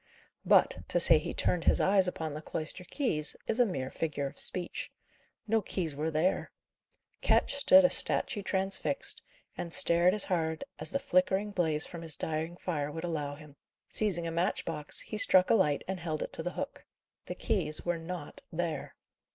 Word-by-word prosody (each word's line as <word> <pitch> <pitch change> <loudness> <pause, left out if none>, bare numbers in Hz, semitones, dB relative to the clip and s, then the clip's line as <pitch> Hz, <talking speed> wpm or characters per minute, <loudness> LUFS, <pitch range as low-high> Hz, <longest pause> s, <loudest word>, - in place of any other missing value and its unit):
But, - - +4
to 175 - +2
say 165 -2 +7
he 150 - -5
turned 175 -2 -1
his - - +4
eyes 190 -1 +4
upon 160 -4 -4
the 155 - -6
cloister 160 +3 -4
keys, 180 - -1
is 225 - -1
a 245 - +5
mere 130 -8 -4
figure 150 -3 -3
of 135 - -7
speech. 180 -1 0 0.5
No 225 0 +1
keys 170 -6 -3
were 155 +3 -2
there. 160 +4 0 0.7
Ketch - - +2
stood 280 0 +6
a - - +3
statue 210 -6 +2
transfixed, 195 - 0 0.3
and 170 - -5
stared 175 +1 +4
as 210 - +2
hard 160 -3 -2 0.2
as - - -3
the 275 - 0
flickering 195 -5 +1
blaze 160 -5 0
from 170 -2 -9
his 160 -3 -2
dying 160 +2 -4
fire 150 -6 -3
would 160 +2 -6
allow 150 -4 -3
him. 150 -1 -15 0.3
Seizing 185 -6 +1
a 165 - -3
match 170 +2 -1
box, 150 -3 -1
he 215 - -4
struck 185 -2 +6
a - - +6
light 150 -10 +2
and 190 -1 -3
held 160 -2 -3
it - - -8
to - - -4
the - - -4
hook. - - -6 0.4
The - - -5
keys 155 - 0
were 175 -1 -1
not 165 -2 -7
there. 165 -3 -4
170 Hz, 185 wpm, -30 LUFS, 155-190 Hz, 0.7 s, say